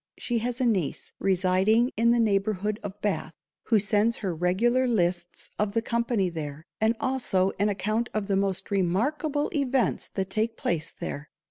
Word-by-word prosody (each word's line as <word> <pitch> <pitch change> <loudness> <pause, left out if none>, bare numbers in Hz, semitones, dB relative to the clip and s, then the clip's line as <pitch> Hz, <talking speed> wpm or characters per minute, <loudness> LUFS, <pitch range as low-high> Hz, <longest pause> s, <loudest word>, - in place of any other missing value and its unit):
_She 240 -2 -1
has 245 +2 -3
a 255 - +2
niece 195 - -1
residing 195 +5 +3
in 230 +1 +3
the 240 0 +4
neighbourhood 210 -1 +1
of 205 0 -7
_Bath, 205 - -1 0.3
_who 225 -3 +4
sends 210 +3 +2
her 185 - 0
regular 220 +10 +2
lists 175 -6 -1
of 205 -1 0
the 230 - +2
company 235 -4 0
there, 155 -2 -6
and 220 +2 +2
also 195 -8 +1
an 205 +1 +3
account 215 +4 -1
of 215 -2 -2
the 195 -1 0
most 195 0 -1
remarkable 275 - 0
events 270 -4 0
that 190 -1 -2
take 225 +2 -1
_place 160 -3 -1
_there. 145 +1 -6
210 Hz, 165 wpm, -27 LUFS, 190-235 Hz, 0.3 s, the